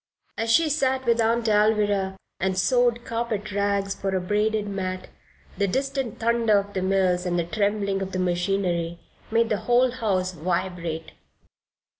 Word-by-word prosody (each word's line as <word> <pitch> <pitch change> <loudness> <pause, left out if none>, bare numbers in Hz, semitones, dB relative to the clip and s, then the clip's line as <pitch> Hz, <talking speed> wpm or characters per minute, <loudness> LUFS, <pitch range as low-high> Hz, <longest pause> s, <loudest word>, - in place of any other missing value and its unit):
As 225 0 -2
she 325 +8 +4
sat 265 -3 0
with 235 -1 +3
Aunt 230 +1 +1
Alvirah, 210 -2 +2 0.2
and 190 0 0
sewed 240 +2 +2
carpet 230 -3 -3
rags 200 0 0
for 195 -1 -3
a - - +2
braided 210 +3 0
mat, 185 -2 -4 0.5
the 200 - +2
distant 270 +1 -2
thunder 230 -2 +2
of 200 0 -2
the 190 - -1
mills 185 -1 +2
and 175 -1 -1
the 170 - +1
trembling 200 +1 -1
of 190 0 -4
the 185 - -3
machinery 175 -1 0 0.3
made 230 0 +2
the 210 - +1
whole 245 +1 +4
house 195 -7 -1
vibrate. 170 -1 -3
200 Hz, 155 wpm, -25 LUFS, 185-230 Hz, 0.5 s, she